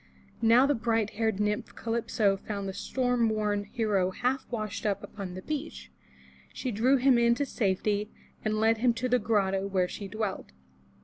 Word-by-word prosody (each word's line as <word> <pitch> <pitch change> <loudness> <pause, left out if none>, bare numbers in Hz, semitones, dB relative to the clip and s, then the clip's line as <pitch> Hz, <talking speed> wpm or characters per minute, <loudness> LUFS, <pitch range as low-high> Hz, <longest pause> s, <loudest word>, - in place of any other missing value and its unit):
Now 230 +3 +6
the 290 - +3
bright 225 -3 0
haired 220 -2 -1
nymph 210 0 -1
Calypso 225 -3 0
found 200 0 -5
the 190 - -4
storm 245 +1 0
worn 210 -1 0
hero 205 -4 0
half 250 +7 -1
washed 215 -4 -4
up 205 -2 -1
upon 190 -3 -7
the 185 - -7
beach. 305 +1 -5 0.6
She 255 - -4
drew 245 +6 +3
him 255 -1 +4
in 235 0 +4
to 285 - -1
safety 205 -2 0 0.3
and 215 0 0
led 220 0 +3
him 240 0 +3
to 255 +2 -1
the 250 0 +3
grotto 195 -3 +1
where 185 -2 +1
she 200 +2 -7
dwelt. 195 - -4
220 Hz, 175 wpm, -29 LUFS, 200-240 Hz, 0.6 s, Now